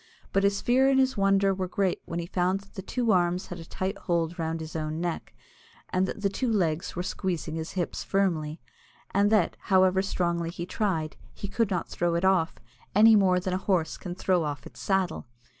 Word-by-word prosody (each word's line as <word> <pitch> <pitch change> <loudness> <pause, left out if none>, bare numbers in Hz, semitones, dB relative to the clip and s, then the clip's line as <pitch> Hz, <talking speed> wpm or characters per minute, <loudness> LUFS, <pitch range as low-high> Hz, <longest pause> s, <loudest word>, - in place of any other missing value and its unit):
But 195 - +3
his 200 0 +2
fear 260 +2 +4
and 270 -1 +4
his 260 0 +2
wonder 195 -1 +3
were 185 -1 -2
great 190 0 0
when 170 - -5
he 170 - -2
found 185 +2 0
that 200 - -21
the 190 - -6
two 235 +3 0
arms 180 -1 +2
had 180 - -6
a 165 - -9
tight 190 +4 -3
hold 170 0 -1
round 165 0 -2
his 160 0 -7
own 155 0 -2
neck, 175 -1 -4 0.5
and 185 +1 +1
that 205 - -6
the 200 - +2
two 235 +5 -1
legs 170 -6 0
were 180 - -2
squeezing 175 -4 -3
his 160 0 -4
hips 180 -3 -2
firmly, 165 -6 0 0.5
and 200 +1 +4
that, 210 -6 +3
however 190 -1 +3
strongly 170 -3 -1
he 170 0 -5
tried, 170 -7 -2 0.2
he 200 - -5
could 225 +1 0
not 180 -4 -1
throw 170 -1 -1
it 170 +2 +1
off, 185 -3 +2 0.4
any 220 +2 +8
more 185 -3 +4
than 185 0 -3
a - - +1
horse 180 -5 0
can 180 -1 -7
throw 185 -2 +1
off 145 -1 -4
its - - -12
saddle. 190 -8 0
185 Hz, 210 wpm, -27 LUFS, 170-195 Hz, 0.5 s, any